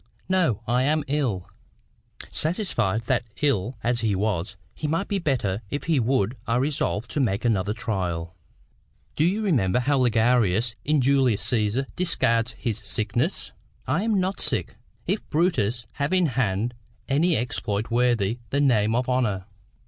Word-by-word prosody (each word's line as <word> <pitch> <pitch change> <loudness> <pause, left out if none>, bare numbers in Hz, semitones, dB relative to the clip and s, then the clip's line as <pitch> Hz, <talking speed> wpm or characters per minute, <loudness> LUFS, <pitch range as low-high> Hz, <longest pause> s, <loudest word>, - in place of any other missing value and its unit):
"No; 170 - +1
I 120 +2 +2
am 150 +3 +2
ill." 125 -11 -1 0.8
Satisfied 120 - 0
that, 120 +1 +1 0.2
ill 125 -4 +1
as 120 0 +1
he 110 -3 +1
was, 100 -1 -1 0.2
he 155 - -4
might 165 +6 -1
be 200 -2 -1
better 120 - -1
if 145 - -3
he 160 -4 +2
would, 120 -2 +1
I 115 - +1
resolved 125 -4 -1
to - - -1
make 110 -5 0
another 105 -2 +1
trial. 85 -7 -3 0.8
"Do 150 - +2
you 195 +6 +1
remember 125 - +2
how 140 +2 +2
Ligarius, 115 -2 +2
in 150 -1 +2
Julius 130 -5 +3
Caesar, 115 +3 +1
discards 115 -10 +2
his 110 -1 -3
sickness?— 105 +4 -2 0.3
"'I 170 - +1
am 215 -3 +2
not 185 +1 -1
sick, - - -2 0.3
if 205 - -1
Brutus 125 - +1
have 140 +1 -2
in 185 -1 +4
hand 120 -4 0 0.3
Any 160 +5 +2
exploit 110 -2 -2
worthy 120 -2 +2
the 140 - 0
name 115 -6 +3
of 125 +1 0
honour. 115 -7 0
120 Hz, 150 wpm, -25 LUFS, 105-145 Hz, 0.8 s, in